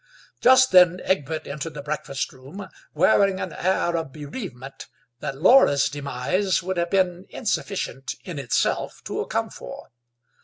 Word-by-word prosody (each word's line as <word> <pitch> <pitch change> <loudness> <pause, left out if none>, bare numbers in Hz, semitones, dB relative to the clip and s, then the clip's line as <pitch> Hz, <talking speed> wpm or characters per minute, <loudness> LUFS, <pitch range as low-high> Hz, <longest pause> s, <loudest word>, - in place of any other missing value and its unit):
Just 260 0 +6
then 180 -1 +6
Egbert 155 -3 -1
entered 150 +2 -6
the 145 - -7
breakfast 145 -2 -4
room, 140 +10 -10 0.3
wearing 195 -2 +3
an - - -4
air 175 -2 0
of 160 -4 -3
bereavement 140 - -8 0.3
that 135 +1 -5
Laura's 165 - +5
demise 145 +8 -1
would 185 0 -3
have 170 0 0
been 185 -1 0
insufficient, 195 - -3
in 170 -6 -6
itself, 125 -4 -1
to - - -4
account - - -3
for. - - -10
170 Hz, 140 wpm, -24 LUFS, 140-190 Hz, 0.3 s, Just